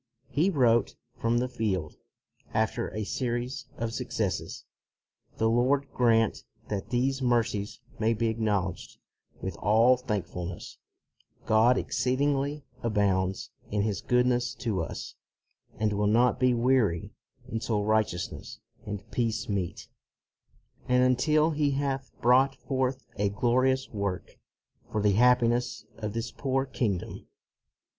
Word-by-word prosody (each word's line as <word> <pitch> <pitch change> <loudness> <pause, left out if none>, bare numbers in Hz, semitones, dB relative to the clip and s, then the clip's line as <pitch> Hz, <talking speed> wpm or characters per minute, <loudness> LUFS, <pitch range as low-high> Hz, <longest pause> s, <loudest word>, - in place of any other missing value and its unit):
He 160 +7 +2
wrote 120 - +3 0.2
from 115 +1 +1
the 125 +1 +1
field, 95 -10 -2 0.6
after - - 0
a 110 - -3
series 125 +3 -3
of 115 0 -3
successes, - - -3 0.4
" - - -38
The 110 - +2
Lord 130 +5 +2
grant 115 -2 +2 0.3
that 100 -2 -3
these 135 +2 0
mercies 115 -4 0 0.2
may 115 +1 +2
be 115 0 0
acknowl 105 -5 0
edged - - -14 0.5
with - - -3
all 115 +5 +4
thankfulness: 95 -7 -5 0.7
God 115 +4 +4
exceed 130 0 0
ingly 145 +1 0 0.2
abounds 95 -4 0 0.2
in 105 -1 0
His 105 -3 -1
goodness 125 0 +1
to 115 -7 -2
us, 80 - -6 0.6
and 110 -1 +1
will 105 0 +1
not 120 +4 +3
be 125 -1 +3
weary 115 -8 +2 0.4
until 110 -2 -1
righteousness 105 -5 -1 0.3
and 105 -1 -5
peace 115 -2 -1
meet, 95 -4 -3 1.0
and 125 0 +4
until 150 +5 +3
He 150 -1 +1
hath 135 -1 -2
brought 130 +3 +4
forth 130 -1 -2
a 100 0 +1
glorious 130 +5 +1
work 100 -4 -4 0.5
for 110 - 0
the 105 0 +3
happiness 120 0 +3
of 105 -2 -4
this 115 +1 -3
poor 135 -1 -1
kingdom.' 110 -8 -3
115 Hz, 125 wpm, -28 LUFS, 105-130 Hz, 1.0 s, all